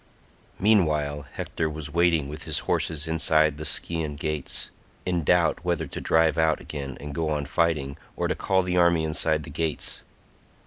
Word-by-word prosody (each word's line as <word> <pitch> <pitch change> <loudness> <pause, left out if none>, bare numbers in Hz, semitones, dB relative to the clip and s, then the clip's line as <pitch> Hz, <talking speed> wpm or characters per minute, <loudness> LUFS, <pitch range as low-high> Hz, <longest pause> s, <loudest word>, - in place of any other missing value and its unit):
Meanwhile 75 -9 +2
Hector 80 - -2
was 75 -2 -7
waiting 85 -4 +3
with 75 +2 -8
his - - +1
horses 80 -1 0
inside 80 -2 +3
the 80 - -4
Scaean 80 -3 -1
gates, 75 -1 -3 0.3
in 90 -2 0
doubt 80 - +2
whether 85 -3 0
to 70 - -7
drive 80 -1 +3
out 80 -1 +3
again 70 -3 -6
and 70 0 -7
go 80 +1 -1
on 75 -2 -1
fighting, 75 -2 0 0.2
or - - -1
to - - +1
call 95 -1 +1
the 90 0 -1
army 85 -2 +4
inside 80 0 +1
the - - -9
gates. 80 -2 -2
80 Hz, 170 wpm, -26 LUFS, 75-85 Hz, 0.3 s, army